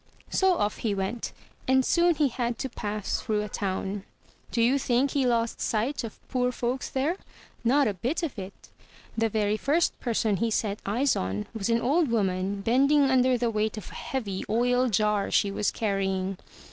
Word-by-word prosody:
So 380 Hz, -1 st, +3 dB
off 205 Hz, 0 st, 0 dB
he 210 Hz, -3 st, -1 dB
went; 195 Hz, +4 st, -3 dB, 0.4 s
and 260 Hz, 0 st, +4 dB
soon 345 Hz, -1 st, +3 dB
he 290 Hz, -2 st, +2 dB
had 240 Hz, -1 st, -2 dB
to 265 Hz, -, -3 dB
pass 210 Hz, -3 st, -3 dB
through 210 Hz, -1 st, 0 dB
a -, -, -4 dB
town. 195 Hz, 0 st, -3 dB, 0.5 s
Do -, -, -2 dB
you 250 Hz, +4 st, +4 dB
think 265 Hz, +1 st, +1 dB
he 275 Hz, -3 st, +1 dB
lost 230 Hz, -1 st, 0 dB
sight 235 Hz, +6 st, 0 dB
of 225 Hz, -, -7 dB
poor 250 Hz, -1 st, 0 dB
folks 245 Hz, +1 st, -2 dB
there? 290 Hz, +7 st, 0 dB, 0.5 s
Not 270 Hz, +4 st, +4 dB
a 210 Hz, -, 0 dB
bit 250 Hz, -, -2 dB
of 280 Hz, -9 st, -3 dB
it! 190 Hz, +1 st, -10 dB, 0.5 s
The 225 Hz, 0 st, +1 dB
very 210 Hz, 0 st, +1 dB
first 310 Hz, +8 st, +1 dB
person 220 Hz, -4 st, 0 dB
he 230 Hz, +3 st, 0 dB
set 215 Hz, -2 st, -1 dB
eyes 245 Hz, +7 st, +2 dB
on 95 Hz, +3 st, -2 dB
was 220 Hz, -1 st, -2 dB
an 230 Hz, 0 st, +2 dB
old 295 Hz, +4 st, +2 dB
woman 195 Hz, -2 st, 0 dB
bending 275 Hz, +5 st, +4 dB
under 255 Hz, -1 st, +4 dB
the 235 Hz, -1 st, 0 dB
weight 215 Hz, 0 st, -1 dB
of 215 Hz, -, -8 dB
a -, -, -12 dB
heavy 205 Hz, -8 st, -4 dB
oil 245 Hz, +3 st, +2 dB
jar 210 Hz, -1 st, +1 dB
she 200 Hz, -, +2 dB
was 205 Hz, +1 st, 0 dB
carrying. 195 Hz, -3 st, -1 dB
230 Hz, 185 wpm, -27 LUFS, 205-260 Hz, 0.5 s, and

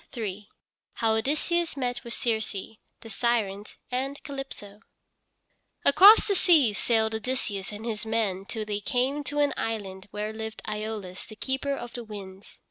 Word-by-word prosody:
III 210 Hz, -2 st, -4 dB, 0.4 s
HOW 225 Hz, -1 st, +2 dB
ODYSSEUS 310 Hz, +7 st, 0 dB
MET 245 Hz, -2 st, -2 dB
WITH 235 Hz, -1 st, -5 dB
CIRCE, 220 Hz, -2 st, -2 dB, 0.2 s
THE 225 Hz, -, -10 dB
SIRENS, 210 Hz, -3 st, -1 dB
AND 270 Hz, +3 st, -2 dB
CALYPSO 270 Hz, -8 st, -7 dB, 1.1 s
Across 385 Hz, +10 st, +9 dB
the 405 Hz, -, +2 dB
seas 310 Hz, -, +4 dB
sailed 220 Hz, -2 st, +2 dB
Odysseus 220 Hz, -4 st, -2 dB
and 210 Hz, +2 st, -7 dB
his 220 Hz, -2 st, -3 dB
men 215 Hz, -4 st, 0 dB
till 220 Hz, +1 st, -4 dB
they 205 Hz, -1 st, -2 dB
came 255 Hz, +7 st, 0 dB
to 290 Hz, +2 st, -4 dB
an 290 Hz, -1 st, +3 dB
island 195 Hz, -4 st, -4 dB
where 210 Hz, +2 st, -4 dB
lived 220 Hz, 0 st, -6 dB
Æolus 210 Hz, -3 st, -4 dB
the 215 Hz, -, -10 dB
keeper 270 Hz, +4 st, -1 dB
of 240 Hz, -3 st, -7 dB
the 240 Hz, -, -5 dB
winds. 200 Hz, -3 st, -10 dB
225 Hz, 150 wpm, -27 LUFS, 210-265 Hz, 1.1 s, Across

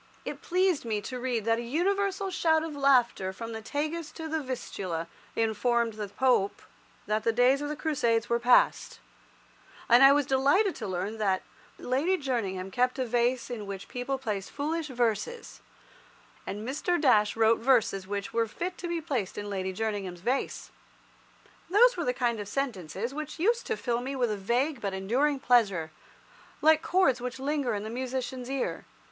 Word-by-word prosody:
It -, -, -5 dB
pleased 365 Hz, -2 st, +1 dB
me 220 Hz, -3 st, -1 dB
to 250 Hz, +5 st, -6 dB
read 240 Hz, -4 st, -2 dB
that 225 Hz, 0 st, +2 dB
"a -, -, -2 dB
universal 385 Hz, +9 st, 0 dB
shout 320 Hz, -3 st, +2 dB
of 320 Hz, -2 st, -5 dB
laughter 250 Hz, -9 st, +3 dB
from 230 Hz, +4 st, -7 dB
the 220 Hz, 0 st, -5 dB
Tagus 305 Hz, +6 st, -3 dB
to 320 Hz, -1 st, -6 dB
the 320 Hz, 0 st, -1 dB
Vistula 190 Hz, -, -4 dB, 0.3 s
informed 230 Hz, +1 st, +1 dB
the 210 Hz, -1 st, -5 dB
Pope 205 Hz, -1 st, +1 dB, 0.4 s
that 215 Hz, +1 st, 0 dB
the 230 Hz, -, +3 dB
days 250 Hz, +4 st, +3 dB
of 290 Hz, -, -3 dB
the 300 Hz, -, -3 dB
crusades 235 Hz, -8 st, 0 dB
were 235 Hz, 0 st, +1 dB
past," 245 Hz, +1 st, +3 dB, 0.9 s
and 240 Hz, +2 st, +6 dB
I 270 Hz, 0 st, +9 dB
was 290 Hz, 0 st, +3 dB
delighted 285 Hz, +10 st, +3 dB
to 220 Hz, -, -5 dB
learn 190 Hz, +4 st, -3 dB
that 195 Hz, -3 st, +1 dB, 0.3 s
"Lady 295 Hz, +10 st, 0 dB
Jerningham 200 Hz, -, -3 dB
kept 250 Hz, +5 st, +1 dB
a 260 Hz, -, 0 dB
vase 240 Hz, +1 st, 0 dB
in 215 Hz, -4 st, -5 dB
which 195 Hz, -1 st, -6 dB
people 255 Hz, +2 st, -3 dB
placed 210 Hz, -7 st, -4 dB
foolish 310 Hz, +2 st, -2 dB
verses, 245 Hz, -, -2 dB, 0.9 s
and 210 Hz, +3 st, -5 dB
Mr. 345 Hz, +6 st, 0 dB
Dash 210 Hz, -8 st, +4 dB
wrote 225 Hz, 0 st, +4 dB
verses 225 Hz, -6 st, +2 dB
which 200 Hz, 0 st, -4 dB
were 230 Hz, 0 st, +1 dB
fit 355 Hz, +11 st, -5 dB
to 350 Hz, -, -4 dB
be 340 Hz, -1 st, -2 dB
placed 255 Hz, -, -3 dB
in 205 Hz, 0 st, -5 dB
Lady 190 Hz, -1 st, -2 dB
Jerningham's 195 Hz, -3 st, -3 dB
vase." 255 Hz, +7 st, -2 dB, 1.0 s
Those 475 Hz, +7 st, +6 dB
were 345 Hz, -3 st, -2 dB
the 250 Hz, -, +2 dB
kind 245 Hz, -3 st, -1 dB
of 205 Hz, -, -5 dB
sentences 225 Hz, -, -3 dB
which 305 Hz, +1 st, -6 dB
used 460 Hz, +8 st, +1 dB
to 445 Hz, -, -1 dB
fill 240 Hz, -1 st, -1 dB
me 270 Hz, +2 st, -4 dB
with 245 Hz, -4 st, +1 dB
a -, -, -1 dB
vague 240 Hz, +7 st, 0 dB
but 195 Hz, -2 st, -2 dB
enduring 260 Hz, +9 st, +1 dB
pleasure, 200 Hz, -, +2 dB, 0.7 s
like 315 Hz, 0 st, +5 dB
chords 335 Hz, -10 st, +2 dB
which 250 Hz, +1 st, -4 dB
linger 270 Hz, -3 st, -1 dB
in 205 Hz, -, -4 dB
the 220 Hz, -, -5 dB
musician's 255 Hz, 0 st, -4 dB
ear. 270 Hz, -1 st, -3 dB
245 Hz, 175 wpm, -28 LUFS, 215-290 Hz, 1.0 s, I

